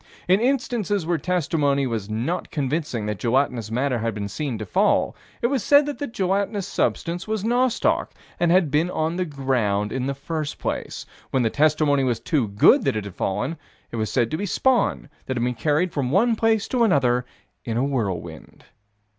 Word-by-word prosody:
In 185 +2 +4
instances 235 - 0
where 170 -1 0
testimony 145 -5 +1
was 110 -5 -3
not 120 +12 -2
convincing 140 -5 -2
that 105 -2 -3
gelatinous 120 -3 0
matter 125 +2 0
had 115 -1 -2
been 100 -1 -3
seen 130 +3 -3
to 110 - -5
fall, 90 - +2 0.3
it - - +3
was 260 -2 +1
said 285 +4 +5
that 290 -1 -5
the 285 - -2
gelatinous 200 -2 -1
substance 175 -1 -1
was 215 -2 -2
nostoc, 245 +2 +1 0.3
and 175 -1 +3
had 175 -5 +3
been 155 +4 +2
upon 160 0 -1
the 185 - 0
ground 125 - -1
in 130 0 -2
the 140 - -2
first 155 +1 -4
place: - - -4 0.2
when 130 - +1
the 115 - +1
testimony 150 -2 +3
was 120 -3 0
too 130 -1 0
good 100 +1 +5
that - - +1
it 105 -2 -3
had 100 - -8
fallen, 105 - -2 0.3
it 115 - -5
was 110 -1 -2
said 120 -3 +1
to 155 - -1
be 205 - -3
spawn 260 +6 +1 0.2
that 130 - -2
had 120 - 0
been 125 0 0
carried 150 +8 0
from 135 -4 -1
one 225 - +3
place 220 -1 +1
to 250 -2 +2
another 130 - +3 0.4
in 115 -1 -3
a 125 - +2
whirlwind. 100 - -4
145 Hz, 195 wpm, -23 LUFS, 120-185 Hz, 0.4 s, said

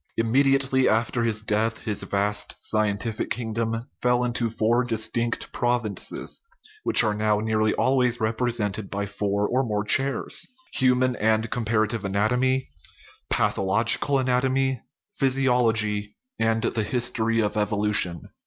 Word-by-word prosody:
Immediately 135 +3 +3
after 115 +2 +1
his 110 -2 0
death 110 +2 0
his 105 -3 -1
vast 100 +1 -1
scientific 110 +1 -1
kingdom 115 0 -2 0.2
fell 125 0 +2
into 120 -1 -1
four 115 +2 +1
distinct 115 0 -2
prov 120 0 +1
inces, 105 -2 -3 0.4
which - - +4
are 105 -2 +1
now 105 0 +1
nearly 110 0 +1
always 125 -2 +2
represented 110 -3 -1
by 100 +1 -3
four 100 0 -1
or 130 +2 +1
more 105 -4 -1
chairs 130 +4 0 0.3
human 130 -1 +2
and 110 +1 +1
comparative 110 -2 0
anat 100 +3 0
omy, 130 +1 +1 0.6
pathological 115 +8 +2
anatomy, 130 0 +1 0.4
physiology, 115 -6 +1 0.2
and 115 0 +1
the 115 - 0
his 120 +3 +1
tory 115 0 0
of 105 -2 0
evolution. 105 -4 +1
115 Hz, 125 wpm, -24 LUFS, 105-125 Hz, 0.6 s, which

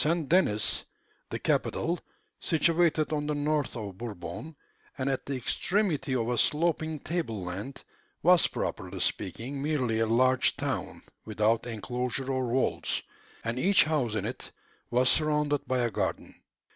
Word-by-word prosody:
St. 160 +1 +1
Denis, 130 - +2 0.5
the - - -2
capital, 170 +1 0 0.4
situated 165 -1 +2
on 150 -1 -1
the 150 - 0
north 145 -1 0
of 100 -4 -6
Bourbon, 110 - -6 0.4
and 130 -1 -1
at 135 - -3
the 140 - -1
extremity 150 - 0
of 115 -2 0
a 120 -1 0
sloping 160 +1 +1
table 145 - -2
land, 100 +10 -5 0.4
was, 180 +1 +6
properly - - -4
speaking, 120 +9 -2
merely 130 -7 0
a 115 - +2
large 130 +3 +3
town, - - -3 0.2
without 110 +2 +1
enclosure 125 +4 -2
or 130 -1 0
walls, 125 +2 0 0.4
and 115 +2 -2
each 195 +6 +5
house 140 -8 0
in 105 -2 -1
it 120 - -5 0.4
was 125 +1 +3
surrounded 150 0 +2
by 130 - +1
a 120 -2 +1
garden. - - -2
130 Hz, 145 wpm, -29 LUFS, 115-155 Hz, 0.5 s, was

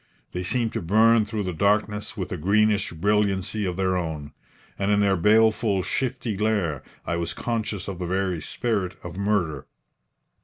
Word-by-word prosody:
They 90 - -3
seemed 115 +5 0
to - - -2
burn 110 +5 +4
through 105 0 -3
the 90 -1 -3
darkness 105 +3 0
with - - -4
a - - -1
greenish 105 +3 +2
brilliancy 100 +3 +1
of 90 -1 -3
their 95 -1 +1
own; 80 -5 -4 0.5
and 100 0 0
in 105 0 +3
their 100 -1 +3
baleful, 110 +1 +3
shifty 125 -2 -2
glare 100 - 0 0.2
I 85 - -1
was 85 -1 -2
conscious 110 -4 -3
of 95 -3 -5
the 90 - -3
very 95 -2 -1
spirit 100 +1 -2
of 90 -1 -7
murder. 95 -9 0
100 Hz, 165 wpm, -25 LUFS, 90-110 Hz, 0.5 s, burn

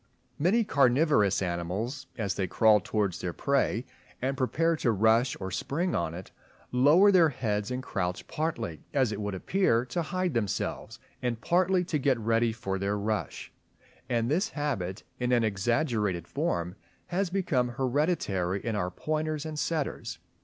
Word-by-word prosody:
Many 195 +10 +3
carnivorous 135 - +3
animals, 95 +10 -3
as 100 -4 -1
they 95 - -2
crawl 110 +3 +5
towards 100 -3 -1
their 90 - -3
prey 135 -3 0 0.3
and 135 +2 -1
prepare 165 +6 +1
to 120 - +1
rush 110 +4 +3
or 95 -1 -5
spring 170 - -1
on 85 -1 -1
it, 90 +1 -9 0.4
lower 150 +11 +6
their 175 -4 +6
heads 105 -6 -2
and 125 0 -3
crouch, 90 -5 -3
partly, 150 - -3
as 130 -5 +3
it 105 0 -4
would 105 -1 -3
appear, 125 - +1
to 170 +7 -2
hide 180 +1 -1
themselves, 110 -5 -2 0.2
and 120 -2 -1
partly 180 +4 +2
to 165 -4 -1
get 135 -2 +2
ready 115 +1 +1
for 95 -4 -3
their 100 +1 0
rush; 105 0 -3 0.6
and 120 -2 +1
this 170 - +1
habit 110 - -3 0.2
in 125 0 0
an 120 -2 +4
exaggerated 110 - 0
form 85 +1 -2 0.3
has 185 +1 -1
become 170 -10 +1
hereditary 120 - 0
in 115 -2 -1
our 90 -3 -1
pointers 155 - -2
and 155 -1 -4
setters. 155 -3 -2
120 Hz, 155 wpm, -28 LUFS, 100-155 Hz, 0.6 s, lower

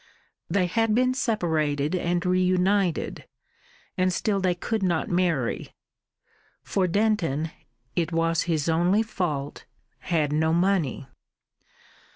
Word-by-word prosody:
They 195 -2 +2
had 220 +4 +1
been 255 +1 +3
separated 160 - 0
and 175 0 0
reunited, 185 0 +1 0.7
and 185 0 +2
still 200 +2 0
they 185 -2 +1
could 220 +5 -2
not 175 -4 0
marry. 170 -9 0 0.9
For 190 -2 0
Denton 170 -6 0 0.4
it 170 -1 0
was 165 0 +1
his 155 -2 0
only 175 +6 +3
fault 155 -10 -3 0.3
had 155 -4 0
no 160 +1 +2
money. 170 -7 +1
175 Hz, 110 wpm, -25 LUFS, 160-195 Hz, 0.9 s, been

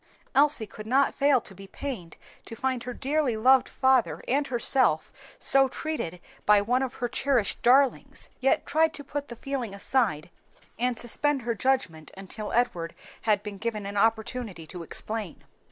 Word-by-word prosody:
Elsie 285 -4 +4
could 215 +1 -11
not 270 +4 +3
fail 280 -2 +3
to 210 - -10
be 195 +1 -12
pained 190 - -6 0.3
to 230 - -7
find 255 0 -2
her 250 - -4
dearly 275 -3 0
loved 260 +3 +5
father 260 -3 +2
and 280 +3 +1
herself 240 - +2 0.3
so 270 0 +5
treated 260 - -4 0.2
by 210 0 +6
one 245 +6 +1
of 265 -1 -3
her 245 - -2
cherished 250 -3 0
darlings, 265 +2 +2
yet 270 +1 +2
tried 320 +1 +2
to 285 - -7
put 285 +1 -5
the 240 - -8
feeling 245 -5 -4
aside 200 - 0 0.5
and 245 0 0
suspend 270 +3 0
her 235 0 -1
judgment 210 -10 -1
until 205 +2 -7
Edward 175 -9 0 0.3
had 210 -2 +1
been 205 -2 -7
given 215 -2 -3
an 200 +1 -5
opportunity 220 -3 -1
to 175 +3 -9
explain. 210 +2 -5
240 Hz, 165 wpm, -27 LUFS, 205-270 Hz, 0.5 s, by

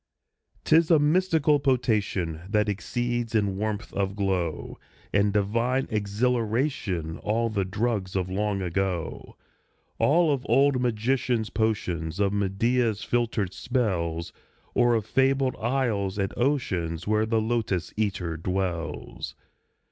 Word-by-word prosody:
'Tis 160 +1 +4
a 165 - +7
mystical 155 -1 +3
potation 105 - 0
That 105 0 +2
exceeds 120 +3 -2
in 100 -3 +1
warmth 105 +2 -3
of 95 0 -1
glow 95 -5 -2 0.3
And 100 0 +3
divine 115 +6 +1
exhilaration 110 - -1
All 115 +2 0
the 100 -3 0
drugs 100 -1 -2
of 95 -2 0
long 100 +1 -1
ago 90 -2 -3 0.6
All 150 +6 +4
of 130 -2 -3
old 140 -2 +4
magicians' 120 -1 0
potions 90 -7 -1
Of 100 -1 +2
Medea's 105 +3 +1
filtered 115 -6 0
spells 85 -10 -1 0.4
Or 120 -1 +4
of 110 -3 -1
fabled 135 +1 +2
isles 110 -6 0
and 95 -2 -1
oceans 90 - -1
Where 110 +1 +2
the 110 0 +2
Lotos 110 -6 -1
eater 95 -6 -1
dwells! 90 -1 -3
110 Hz, 115 wpm, -26 LUFS, 95-120 Hz, 0.6 s, a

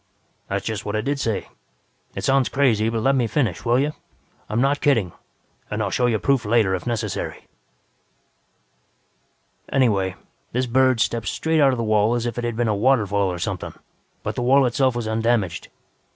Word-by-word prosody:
"That's 100 0 -3
just 110 -2 -3
what 105 - -3
I 110 - 0
did 140 +5 -2
say. 115 -6 -2 0.7
It - - -5
sounds 135 -2 +2
crazy, 115 -6 +2
but 115 -1 -2
let 135 - +3
me 125 -3 +1
finish, 125 0 -1
will 120 0 +2
you? 145 +3 0 0.6
I'm 105 +2 0
not 140 +3 +1
kidding, 115 -11 +2 0.6
and 105 - -3
I'll 100 -3 -1
show 125 +4 +1
you 115 -2 +1
proof 135 +3 +1
later 105 -3 +2
if 95 +5 -3
necessary. 110 -5 -3 2.3
"Anyway, 100 -8 +2 0.4
this 125 +2 +1
bird 130 -1 +3
stepped 115 0 -1
straight 160 -1 0
out 140 -2 +5
of 130 - -2
the 115 - -1
wall 110 +1 +2
as 120 -1 -2
if 120 0 -3
it - - -4
had 120 -1 -2
been 120 0 0
a 110 - +2
waterfall 105 -4 +2
or 90 - -4
something, - - -4 0.5
but - - -2
the - - -4
wall 135 +2 +4
itself 130 +1 +1
was 120 -2 -3
undamaged. 110 -5 0
115 Hz, 185 wpm, -22 LUFS, 105-130 Hz, 2.3 s, out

